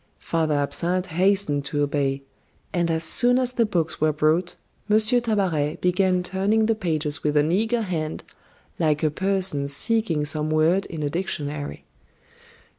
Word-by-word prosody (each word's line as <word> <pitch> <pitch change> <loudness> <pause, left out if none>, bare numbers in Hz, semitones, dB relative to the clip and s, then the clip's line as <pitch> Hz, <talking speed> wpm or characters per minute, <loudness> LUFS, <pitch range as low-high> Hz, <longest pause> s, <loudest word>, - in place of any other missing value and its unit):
Father 160 -2 -1
Absinthe 175 +6 -1
hastened 180 -4 +1
to 145 +1 -1
obey; 140 -1 -1 0.5
and 170 -1 0
as 160 0 -1
soon 245 +9 +4
as 255 -1 +1
the 235 -3 +1
books 170 -7 -2
were 155 0 +3
brought, 155 +4 0 0.3
M. 210 - +5
Tabaret 210 - +1
began 180 0 +1
turning 195 +4 +1
the 225 - +2
pages 155 -8 -2
with 150 0 +1
an 150 +2 +2
eager 225 +5 +1
hand, 160 -5 -4 0.6
like 155 -2 +1
a 155 - +2
person 190 -5 +1
seeking 165 0 0
some 150 0 -1
word 160 +5 +2
in 160 -4 -6
a 145 - -1
dictionary. 150 -4 -4
170 Hz, 150 wpm, -23 LUFS, 150-195 Hz, 0.6 s, M